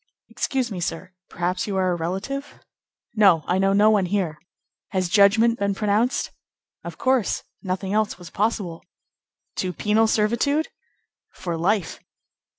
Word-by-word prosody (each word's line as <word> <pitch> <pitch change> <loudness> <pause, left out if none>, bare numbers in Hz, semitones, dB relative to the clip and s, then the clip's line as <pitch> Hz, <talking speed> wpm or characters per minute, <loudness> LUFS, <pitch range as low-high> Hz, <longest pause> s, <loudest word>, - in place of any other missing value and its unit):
"Excuse 260 -4 -2
me 190 - -4
sir; 175 +2 -4 0.2
perhaps 180 +3 -2
you 200 -2 -2
are 185 -1 +2
a - - 0
relative?" 195 - -4 0.6
"No; 195 -8 +5
I 180 - +1
know 195 0 +3
no 205 +2 +5
one 200 -4 +2
here. 175 -6 -1 0.5
Has 185 -2 0
judgment 220 +5 +4
been 200 -1 0
pronounced?" 215 +6 0 0.5
"Of - - -8
course. 260 -5 +1 0.2
Nothing 190 +1 -3
else 215 0 0
was 175 -2 -12
possible." 200 -5 -2 0.7
"To 185 - -1
penal 215 +5 +2
servitude?" 235 +9 +1 0.6
"For 175 -2 -5
life." 185 +2 0
200 Hz, 140 wpm, -23 LUFS, 180-220 Hz, 0.7 s, No